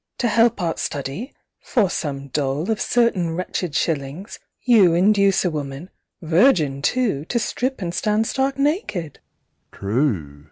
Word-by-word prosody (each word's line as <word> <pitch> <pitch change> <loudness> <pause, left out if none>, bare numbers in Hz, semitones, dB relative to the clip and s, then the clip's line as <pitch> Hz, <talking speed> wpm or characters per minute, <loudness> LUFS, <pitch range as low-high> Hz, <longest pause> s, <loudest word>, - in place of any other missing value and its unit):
To 245 - 0
help 230 0 +3
Art 170 -3 -2
study, 145 - -4 0.3
for 225 -7 +1
some 140 -5 -4
dole 145 - -1
Of 215 - -1
certain 190 -9 +1
wretched 180 -3 -3
shillings, 150 +4 -2 0.2
you 205 -9 +5
Induce 200 +1 +3
a 180 - +1
woman 145 +2 -6 0.3
virgin 160 - +3
too 210 - 0
To 235 - -2
strip 245 +1 -2
and 170 -1 -3
stand 215 +4 +1
stark 270 +3 -1
naked? 275 - -1
185 Hz, 130 wpm, -21 LUFS, 150-230 Hz, 0.3 s, you